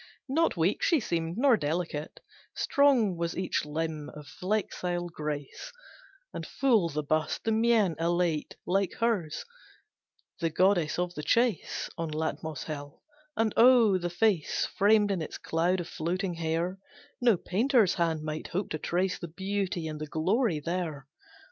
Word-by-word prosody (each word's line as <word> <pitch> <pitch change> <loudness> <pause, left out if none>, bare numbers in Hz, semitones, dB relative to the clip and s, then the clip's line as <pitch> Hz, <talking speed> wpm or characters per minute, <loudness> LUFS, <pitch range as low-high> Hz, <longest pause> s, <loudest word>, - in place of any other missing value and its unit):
Not 315 - +1
weak 170 +5 +1
she 330 - +3
seemed, 170 -5 -2
nor 265 0 +5
delicate, 155 -1 -3 0.3
Strong 255 -10 +3
was 170 0 -2
each 185 -4 -1
limb 155 0 -3
of 150 -1 -9
flexile 180 -2 -2
grace, 150 -3 -5 0.6
And - - -5
full 230 -11 +2
the 150 0 -3
bust; 155 +2 -1
the 225 - 0
mien 220 -5 +3
elate, 170 -2 0
Like 195 +1 +1
hers, 210 -10 -1 0.9
the 165 - 0
goddess 175 -1 +2
of 175 0 -1
the 150 - -5
chase 230 +6 +1
On 165 -1 -2
Latmos 155 -1 -3
hill, 145 -2 -7 0.3
and 225 -2 +1
oh, 230 -5 +6
the 175 0 -2
face 175 -2 +1
Framed 205 0 +4
in 185 -4 -1
its 155 - -5
cloud 175 +3 0
of 175 - -4
floating 180 +4 -2
hair, 170 +3 -2 0.4
No 235 -5 +4
painter's 220 - +2
hand 165 -3 0
might 155 0 -4
hope 185 +3 -3
to 155 - -2
trace 185 +4 -1
The 170 - -5
beauty 190 -1 -3
and 155 -1 -6
the 155 - -4
glory 180 - +1
there! 165 -4 -3
175 Hz, 150 wpm, -29 LUFS, 160-205 Hz, 0.9 s, oh